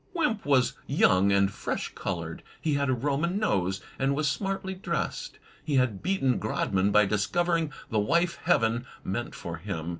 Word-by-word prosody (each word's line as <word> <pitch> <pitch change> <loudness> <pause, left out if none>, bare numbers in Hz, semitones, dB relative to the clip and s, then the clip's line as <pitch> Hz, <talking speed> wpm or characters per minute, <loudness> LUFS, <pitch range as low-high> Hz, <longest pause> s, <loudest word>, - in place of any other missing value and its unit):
Wimp 245 - 0
was 130 -3 +4
young 100 -8 +4
and 100 0 +3
fresh - - -3
colored. - - -4 0.2
He 155 - 0
had 140 -1 +1
a - - +3
Roman 145 +8 0
nose, 95 - 0 0.2
and 135 +1 +2
was 150 +1 +1
smartly 195 +5 -2
dressed. 185 -3 -3 0.3
He 150 -2 -1
had 125 -7 +2
beaten 165 -9 +1
Grodman 100 -2 0
by 105 0 +5
discovering 165 - +1 0.2
the 110 - +2
wife 170 +10 +1
Heaven 120 -7 +2 0.2
meant 120 +6 -3
for 85 -1 -6
him. 85 -2 -4
135 Hz, 160 wpm, -28 LUFS, 100-170 Hz, 0.3 s, by